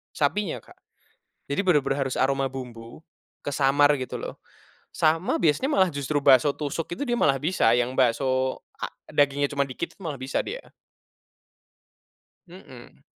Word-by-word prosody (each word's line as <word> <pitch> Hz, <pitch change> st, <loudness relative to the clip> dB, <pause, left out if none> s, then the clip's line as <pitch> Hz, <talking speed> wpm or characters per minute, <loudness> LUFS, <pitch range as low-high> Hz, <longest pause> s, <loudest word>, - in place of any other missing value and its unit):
sapinya, 165 Hz, +5 st, 0 dB
Kak. -, -, -18 dB, 0.7 s
Jadi 140 Hz, -, -1 dB
bener-bener 145 Hz, -7 st, +1 dB
harus 130 Hz, -, -4 dB
aroma 135 Hz, +1 st, +1 dB
bumbu, 125 Hz, 0 st, -9 dB, 0.4 s
kesamar 145 Hz, +1 st, +3 dB
gitu 130 Hz, -, -5 dB
loh. -, -, -7 dB, 0.5 s
Sama 165 Hz, +3 st, +1 dB
biasanya 170 Hz, -, +2 dB
malah 190 Hz, -10 st, +3 dB
justru 145 Hz, +1 st, -1 dB
bakso 135 Hz, 0 st, +6 dB
tusuk 155 Hz, +3 st, -4 dB
itu -, -, -8 dB
dia 240 Hz, -2 st, 0 dB
malah 135 Hz, -, +3 dB
bisa 160 Hz, -7 st, +2 dB
yang 125 Hz, +1 st, 0 dB
bakso 130 Hz, +1 st, +1 dB, 0.2 s
a -, -, -3 dB, 0.2 s
dagingnya 145 Hz, 0 st, +2 dB
cuman 140 Hz, -1 st, 0 dB
dikit 130 Hz, -, -5 dB
tuh -, -, -20 dB
malah 150 Hz, -4 st, -3 dB
bisa 130 Hz, +1 st, -2 dB
dia. -, -, -8 dB, 1.8 s
Mhm. 150 Hz, -9 st, -14 dB
140 Hz, 140 wpm, -25 LUFS, 130-160 Hz, 1.8 s, bakso